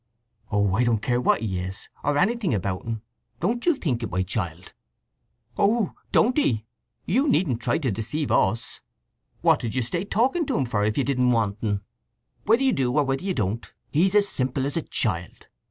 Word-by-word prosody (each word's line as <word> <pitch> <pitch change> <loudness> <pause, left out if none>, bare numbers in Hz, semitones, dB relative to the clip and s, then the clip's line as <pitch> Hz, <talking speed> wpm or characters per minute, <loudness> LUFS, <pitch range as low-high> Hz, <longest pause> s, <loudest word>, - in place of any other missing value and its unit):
"Oh, 100 -2 +2
I 115 +5 +3
don't 120 -2 +2
care 120 +3 0
what - - +2
he 95 -5 -2
is, 95 +2 -6 0.2
or 145 0 +1
anything 195 - +1
about 95 +1 -3
'n. 115 -1 -3 0.4
Don't 230 +8 0
you 340 - +5
think 130 - -1
it, 115 - -3
my 95 0 0
child!" 90 -3 -4 0.8
"Oh, 210 +1 +2 0.2
don't 245 +3 +4
ye! 110 - +1 0.4
You 265 - +2
needn't 140 - +1
try - - +1
to 135 -7 -1
deceive 120 +9 -2
us! 110 +4 +1 0.6
What - - +4
did 115 -1 -4
you 130 - +1
stay 170 +9 -2
talking 260 - +1
to - - 0
him 135 - +1
for, 105 -4 0
if 105 +1 0
you 140 - +3
didn't 125 -2 +2
want 110 -3 0
un? 105 -2 0 0.6
Whether 230 +5 +4
you 265 - +3
do 130 -3 +1
or 150 - +5
whether 135 +3 -1
you 190 -1 -1
don't, 110 0 -2 0.2
he's 185 +6 +3
as 205 -1 +5
simple 130 -4 -1
as 140 - -3
a 165 - +1
child. 90 - -3
125 Hz, 200 wpm, -25 LUFS, -, 0.8 s, you